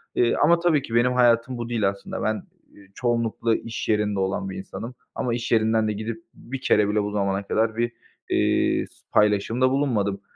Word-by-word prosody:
eee, 120 -1 +3
ama 170 +2 +5
tabii 165 -4 +2
ki 115 -4 -5
benim 120 +2 +4
hayatım 120 0 +3
bu 120 0 -5
değil 110 -5 +1
aslında. 100 0 -6
Ben, 110 -2 -1 0.3
eee, 100 -1 -17
çoğunlukla 115 -2 0
iş 115 -1 -5
yerinde 105 -2 +1
olan 95 - -1
bir 190 - -6
insanım 150 -10 -7 0.2
ama 120 -2 -1
iş 120 0 -3
yerinden 110 -1 +3
de 105 - 0
gidip 110 +2 -5
bir 130 +1 -8
kere 105 -1 +3
bile 105 0 +1
bu 105 - -3
zamana 100 -1 -1
kadar 110 +2 0
bir, 120 0 0 0.4
eee, - - +2
s - - -25 0.2
paylaşımda 105 +5 +3
bulunmadım. 110 -8 0
115 Hz, 190 wpm, -24 LUFS, 105-125 Hz, 0.4 s, ama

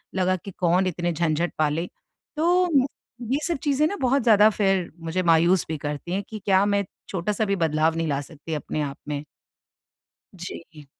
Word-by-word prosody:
लगा 185 0 +2
कि 195 +2 -8
कौन 180 +1 +3
इतने 175 0 -1
झंझट 165 +1 0
पाले। 155 +2 +1 0.5
तो 350 +3 +3 0.6
ये 285 - +2
सब 340 - -1
चीज़ें 290 0 +2
ना 400 - -3
बहुत 265 +1 +2
ज़्यादा 215 -2 +6
फिर 195 -4 0
मुझे 165 +3 -2
मायूस 170 +1 +4
भी 160 -1 -3
करती 145 +4 -5
हैं 195 +2 -1
कि 215 - -6
क्या 195 0 +4
मैं 200 0 +1 0.3
छोटा-सा 200 +4 -1
भी 200 -1 +1
बदलाव 160 -1 +1
नहीं 165 0 -1
ला 140 -1 0
सकती 155 +2 -8
अपने 150 0 -3
आप 140 -1 -4
में? 145 -1 -3 1.1
जी। 165 -4 -9
175 Hz, 175 wpm, -24 LUFS, 160-205 Hz, 1.1 s, ज़्यादा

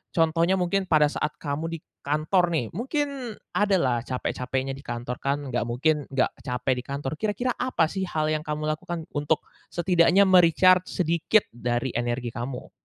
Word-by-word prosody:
contohnya 165 +2 +3
mungkin 190 +1 0
pada 150 -3 +4
saat 150 0 -2
kamu 145 +2 -3
di 165 0 -5 0.2
kantor 155 +5 +1
nih, 155 -10 -1
mungkin 265 - -3 0.2
ada 205 -1 +2
lah 130 -9 +2
capek-capeknya 130 +1 -2
di 135 - -7
kantor 125 -2 -5
kan, 140 0 -2
nggak 120 -1 -1
mungkin 145 +5 0
nggak 135 -2 +1 0.2
capek 125 +1 0
di - - -7
kantor. 140 -1 -3
Kira-kira 220 +4 0
apa 210 -11 +1
sih 190 -1 -2
hal 155 -2 0
yang 155 - +1
kamu 150 0 -4
lakukan 170 +1 -4
untuk 150 +1 0 0.2
setidaknya 175 +2 +4
me-recharge 185 0 +5
sedikit 170 +4 +2
dari 120 +2 -2
energi 120 0 -2
kamu? 125 +2 -6
155 Hz, 165 wpm, -26 LUFS, 135-180 Hz, 0.2 s, me-recharge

